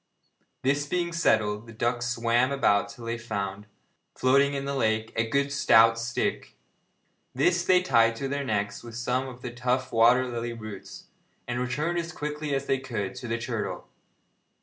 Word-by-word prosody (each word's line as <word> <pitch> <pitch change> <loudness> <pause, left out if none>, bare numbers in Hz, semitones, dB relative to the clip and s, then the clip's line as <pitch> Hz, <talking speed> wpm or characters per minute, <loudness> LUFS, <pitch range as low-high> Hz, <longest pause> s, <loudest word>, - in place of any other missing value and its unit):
This 145 +2 +1
being 170 +2 -1
settled, 110 -9 +1
the 115 - -11
ducks 120 +2 -1
swam 120 +2 +1
about 105 -7 +2
till 120 -4 -10
they 115 0 -3
found, 105 -2 -4 0.5
floating 140 +2 +3
in 135 0 -3
the 140 - -2
lake, 110 -4 0
a 115 0 0
good 140 +3 +1
stout 115 -5 +5
stick. 120 +1 -2 0.8
This 175 +6 +2
they 180 0 +4
tied 115 -7 +4
to 135 +4 -3
their 140 +1 -2
necks 105 -5 -2
with 115 -1 -10
some 125 +2 -1
of 125 -1 -11
the 125 - -4
tough 125 +2 -1
water 120 +3 +4
lily 120 -1 -4
roots, 110 -4 -9 0.4
and 120 0 -2
returned 150 +8 -1
as 170 0 -5
quickly 150 -1 -3
as 135 0 -2
they 135 -1 +1
could 110 -8 -4
to 120 - -7
the 115 0 -1
turtle. 115 -2 -4
120 Hz, 170 wpm, -27 LUFS, 115-140 Hz, 0.8 s, stout